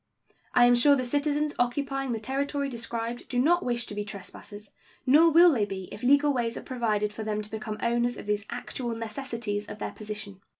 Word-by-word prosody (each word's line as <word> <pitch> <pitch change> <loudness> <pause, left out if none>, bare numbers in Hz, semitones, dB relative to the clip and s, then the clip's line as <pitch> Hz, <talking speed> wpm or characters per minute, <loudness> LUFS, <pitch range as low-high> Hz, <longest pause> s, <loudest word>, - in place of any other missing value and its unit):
I 245 - +7
am 245 - +6
sure 280 +4 +6
the 255 -2 -1
citizens 290 +3 0
occupying 270 +2 0
the 225 - -2
territory 280 +4 -2
described 235 -1 -5
do 250 - -2
not 345 +8 +3
wish 240 -1 -1
to - - -8
be 205 0 -3
trespassers, 205 +1 -9 0.3
nor 305 +6 +6
will 340 +2 +7
they 235 -8 +1
be 190 -2 -6
if - - -8
legal 285 +3 +4
ways 235 -2 -1
are - - -7
provided 215 -5 -1
for 220 - -6
them 215 -1 -2
to 210 - -8
become 215 -1 -5
owners 240 0 +1
of - - -8
these 210 -1 -1
actual 240 -3 -4
necessities 225 -2 -4
of - - -7
their - - -4
position. 210 -2 -7
235 Hz, 205 wpm, -27 LUFS, 210-275 Hz, 0.3 s, I